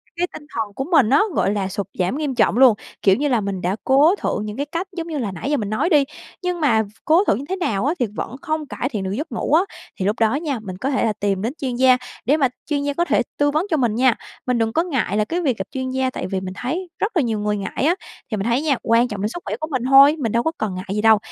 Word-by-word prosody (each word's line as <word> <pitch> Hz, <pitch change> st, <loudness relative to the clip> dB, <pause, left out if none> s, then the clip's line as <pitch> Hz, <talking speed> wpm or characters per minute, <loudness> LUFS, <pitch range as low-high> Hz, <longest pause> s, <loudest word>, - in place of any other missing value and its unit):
cái 350 Hz, +1 st, 0 dB
tinh 295 Hz, -, -9 dB
thần 215 Hz, -3 st, -2 dB
của 265 Hz, -, -2 dB
mình 260 Hz, -10 st, +5 dB
á, 280 Hz, -, +5 dB, 0.2 s
gọi -, -, +2 dB
là, 195 Hz, -2 st, -1 dB
sụt 200 Hz, 0 st, -4 dB
giảm 185 Hz, +10 st, 0 dB
nghiêm 290 Hz, -4 st, -2 dB
trọng 235 Hz, -, +2 dB
luôn. 255 Hz, -4 st, +7 dB, 0.3 s
Kiểu 195 Hz, -1 st, +5 dB
như 290 Hz, +6 st, 0 dB
là 245 Hz, -5 st, +2 dB
mình 195 Hz, -2 st, -3 dB
đã 180 Hz, +3 st, 0 dB
cố 290 Hz, +7 st, +5 dB
thử 310 Hz, -, -2 dB
những 210 Hz, +2 st, -5 dB
cái 285 Hz, -, -1 dB
cách 335 Hz, +5 st, -4 dB
giống 335 Hz, 0 st, -3 dB
như 310 Hz, -3 st, -3 dB
là 220 Hz, -7 st, -2 dB
nãy 190 Hz, -, -5 dB
giờ 295 Hz, -, +2 dB
mình 205 Hz, -2 st, -3 dB
nói 215 Hz, +10 st, 0 dB
đi, 295 Hz, -5 st, +5 dB, 0.4 s
nhưng 360 Hz, -1 st, -1 dB
v -, -, -8 dB
mà 225 Hz, -6 st, +3 dB, 0.2 s
cố 335 Hz, +6 st, +5 dB
thử -, -, +4 dB
như 270 Hz, +5 st, -5 dB
thế 380 Hz, -, 0 dB
nào 235 Hz, -, -1 dB
á 305 Hz, -, +2 dB
thì 245 Hz, -, +2 dB
vẫn 245 Hz, -, -4 dB
không 310 Hz, -3 st, -2 dB
cải 255 Hz, -, -3 dB
thiện 210 Hz, -8 st, -3 dB
được 190 Hz, -, -3 dB
giấc 270 Hz, +7 st, -4 dB
ngủ 235 Hz, -, -2 dB
á. 325 Hz, -, +6 dB, 0.4 s
Thì 185 Hz, -, -1 dB
lúc 210 Hz, +3 st, 0 dB
đó 225 Hz, +3 st, +3 dB
nha, 285 Hz, -5 st, -2 dB
mình 185 Hz, -4 st, -7 dB
có 260 Hz, +8 st, -2 dB
thể 265 Hz, -, +1 dB
là 220 Hz, -, +1 dB
tìm 200 Hz, -2 st, -1 dB
đến 230 Hz, +5 st, -2 dB
chuyên 255 Hz, -3 st, -2 dB
gia, 255 Hz, 0 st, +5 dB, 0.3 s
để 290 Hz, +4 st, +3 dB
mà 270 Hz, -4 st, +3 dB, 0.2 s
chuyên 285 Hz, -2 st, -1 dB
gia 285 Hz, 0 st, -1 dB
có 345 Hz, +3 st, 0 dB
thể -, -, +2 dB, 0.2 s
tư 290 Hz, 0 st, +2 dB
vấn 310 Hz, +5 st, +1 dB
cho 315 Hz, -, +2 dB
mình 235 Hz, -5 st, +1 dB
nha. 250 Hz, -1 st, +4 dB, 0.3 s
Mình 250 Hz, -1 st, +1 dB
đừng 225 Hz, 0 st, 0 dB
có 330 Hz, -, +2 dB
ngại 255 Hz, -, -1 dB
là 215 Hz, -, +2 dB
cái 345 Hz, +9 st, -2 dB
việc 265 Hz, -8 st, 0 dB
gặp 190 Hz, -, -3 dB
chuyên 260 Hz, -1 st, -3 dB
gia 260 Hz, 0 st, 0 dB
tại 180 Hz, -, -5 dB
vì 190 Hz, 0 st, -2 dB
mình 185 Hz, -1 st, -5 dB
thấy 340 Hz, +9 st, -3 dB
rất 420 Hz, -, 0 dB
là -, -, +5 dB
nhiều 225 Hz, -3 st, -1 dB
người 210 Hz, 0 st, 0 dB
ngại 200 Hz, +7 st, -2 dB
á, 345 Hz, +3 st, +3 dB, 0.4 s
thì 215 Hz, -, -1 dB
mình 195 Hz, -, -2 dB
thấy 240 Hz, +4 st, +2 dB
nha 290 Hz, -5 st, +1 dB
quan 230 Hz, +2 st, +3 dB
trọng 205 Hz, -3 st, -5 dB
đến 210 Hz, -, 0 dB
sức 350 Hz, -, -7 dB
khỏe -, -, -2 dB
của 310 Hz, -, -3 dB
mình 255 Hz, -3 st, -1 dB
thôi, 275 Hz, +2 st, +8 dB
mình 230 Hz, -5 st, -1 dB
đâu 235 Hz, 0 st, +1 dB
có 320 Hz, -, +1 dB
cần 210 Hz, -4 st, -2 dB
ngại 185 Hz, +2 st, -6 dB
gì 210 Hz, -, 0 dB
đâu. 220 Hz, -1 st, +6 dB
255 Hz, 310 wpm, -21 LUFS, 210-295 Hz, 0.4 s, thôi